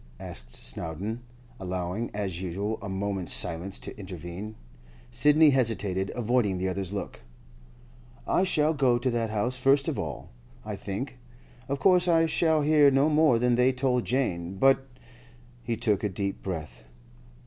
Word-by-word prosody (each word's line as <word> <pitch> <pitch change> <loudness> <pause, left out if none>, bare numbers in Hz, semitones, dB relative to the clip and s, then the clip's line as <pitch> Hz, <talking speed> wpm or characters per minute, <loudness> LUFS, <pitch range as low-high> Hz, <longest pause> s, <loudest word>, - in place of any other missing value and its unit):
asked - - -9
Snowdon, 85 - -3 0.4
allowing, 95 +4 -3
as 95 -4 -3
usual, 100 +4 -3
a 100 - -6
moment's 95 -2 -2
silence 90 +3 -1
to - - -6
intervene. 95 +2 -7 0.6
Sidney 150 +1 +5
hesitated, 105 -7 0
avoiding 115 -5 +1
the 95 +1 -1
other's 95 0 -3
look. 100 -1 -5 1.0
'I 185 - +2
shall 155 -4 +2
go 130 -5 +3
to 125 +1 -1
that 115 -1 -1
house 110 +4 -1
first 135 +2 +3
of - - -2
all, - - -6 0.3
I 105 -1 -4
think. 105 +7 -5 0.5
Of 140 0 -1
course 180 +3 +4
I 165 -1 +4
shall 160 -1 +2
hear 150 -1 +6
no 135 +3 +3
more 150 -5 +4
than 125 +1 +2
they 125 +2 +4
told 125 -1 0
Jane; 95 -9 -1
but—' 135 +5 +3 0.7
He 115 -1 -3
took 110 -4 0
a 105 - +1
deep 100 +1 -3
breath. 75 -10 -6
110 Hz, 150 wpm, -27 LUFS, 95-135 Hz, 1.0 s, hear